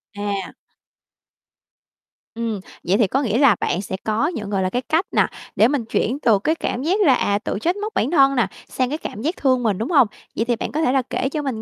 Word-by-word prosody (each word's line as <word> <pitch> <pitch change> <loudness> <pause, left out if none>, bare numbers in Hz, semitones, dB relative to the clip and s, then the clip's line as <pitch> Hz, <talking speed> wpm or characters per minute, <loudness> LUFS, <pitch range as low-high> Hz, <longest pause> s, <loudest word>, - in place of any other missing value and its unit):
À. 205 -2 -3 1.8
Ừm, 230 -3 -2 0.2
vậy 185 +4 +2
thì 215 - +3
có 270 +8 0
nghĩa 225 -4 0
là 275 -5 +5
bạn 175 - -1
sẽ 190 - -5
có 220 +6 +1
những, 220 - -4
gọi 195 -2 0
là, 185 - 0
cái 245 +6 -1
cách 320 +8 0
nà, - - +3 0.3
để 220 - +5
mình 265 -5 -1
chuyển 245 +4 -1
từ 225 -8 +3
cái 310 +11 0
cảm 260 -5 -3
giác 375 +7 +1
là, 275 - +6
à, 200 -3 +1
tự 200 - -3
trách 345 - 0
móc 420 +2 -5
bản 250 - 0
thân 275 -4 +5
nà, 245 - +2 0.2
sang 255 -1 -1
cái 300 - -2
cảm 215 - -7
giác 320 +8 -1
thương 255 -3 +2
mình, 210 -5 +1
đúng 230 - -3
hông? 280 -8 +5 0.3
Vậy 225 - 0
thì 240 0 +1
bạn - - -4
có 310 - -1
thể 250 - +2
là 265 0 +3
kể 265 - -1
cho 300 +2 -3
mình 260 -6 -3
245 Hz, 250 wpm, -21 LUFS, 215-290 Hz, 1.8 s, là